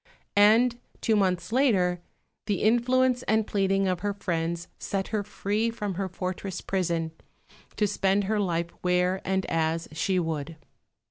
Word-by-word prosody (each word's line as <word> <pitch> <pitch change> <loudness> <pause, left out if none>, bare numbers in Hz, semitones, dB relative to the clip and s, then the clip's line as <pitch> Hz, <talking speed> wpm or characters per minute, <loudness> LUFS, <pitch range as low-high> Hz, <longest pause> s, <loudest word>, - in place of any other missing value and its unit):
And 230 +4 +5 0.2
two 225 - +2
months 185 -2 +1
later, 190 -9 +2 0.5
the 205 -3 0
influence 250 +3 +3
and 220 0 +3
pleading 195 -1 +1
of 180 -2 0
her 205 -1 -2
friends 170 -3 -2
set 195 -1 -3
her 215 -1 0
free 210 +2 -1
from 210 -4 -3
her 190 +1 -3
fortress 185 +1 -4
prison 170 -4 -1 0.6
to 210 - +2
spend 200 0 +1
her 210 +2 0
life 170 -3 -1
where 180 +1 +1
and 190 0 0
as 165 0 0
she 185 +4 0
would. 160 -2 -2
195 Hz, 145 wpm, -27 LUFS, 180-210 Hz, 0.6 s, And